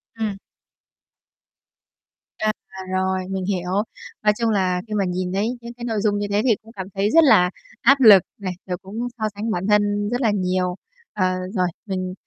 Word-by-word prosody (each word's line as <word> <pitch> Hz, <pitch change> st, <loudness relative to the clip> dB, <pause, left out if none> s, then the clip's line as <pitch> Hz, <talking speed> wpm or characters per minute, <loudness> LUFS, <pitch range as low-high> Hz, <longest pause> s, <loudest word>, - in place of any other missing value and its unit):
Ừm. 215 Hz, -3 st, -3 dB, 2.0 s
À, 215 Hz, 0 st, +1 dB, 0.4 s
rồi, 190 Hz, 0 st, 0 dB
mình 190 Hz, -1 st, -3 dB
hiểu. 180 Hz, -2 st, -2 dB, 0.5 s
Nói 210 Hz, -, +5 dB
chung 230 Hz, -1 st, +1 dB
là 185 Hz, -3 st, +1 dB
khi 215 Hz, -, -6 dB
mà 200 Hz, -2 st, +1 dB
nhìn 180 Hz, 0 st, -2 dB
thấy 200 Hz, +3 st, +1 dB
những 235 Hz, 0 st, -8 dB
cái 240 Hz, 0 st, -8 dB
nội 220 Hz, -3 st, -1 dB
dung 205 Hz, -1 st, +1 dB
như 205 Hz, 0 st, -2 dB
thế 205 Hz, +1 st, +2 dB
thì 235 Hz, -5 st, +4 dB
cũng 225 Hz, -, -15 dB
cảm 190 Hz, -3 st, -6 dB
thấy 200 Hz, +2 st, +1 dB
rất 330 Hz, 0 st, +7 dB
là 205 Hz, -10 st, +6 dB, 0.3 s
áp 275 Hz, 0 st, +5 dB
lực 205 Hz, -6 st, +9 dB
này, 190 Hz, -3 st, -4 dB, 0.2 s
rồi 180 Hz, -1 st, -2 dB
cũng 220 Hz, +6 st, -5 dB
so 220 Hz, -, -5 dB
sánh 215 Hz, +2 st, -3 dB
bản 180 Hz, +1 st, -2 dB
thân 205 Hz, 0 st, +2 dB
rất 245 Hz, +2 st, -1 dB
là 220 Hz, -3 st, +3 dB
nhiều. 185 Hz, -2 st, 0 dB, 0.4 s
Ờ, 185 Hz, -3 st, +1 dB, 0.2 s
rồi, 180 Hz, -3 st, +1 dB, 0.2 s
mình 185 Hz, -2 st, -3 dB
205 Hz, 190 wpm, -22 LUFS, 185-220 Hz, 2.0 s, lực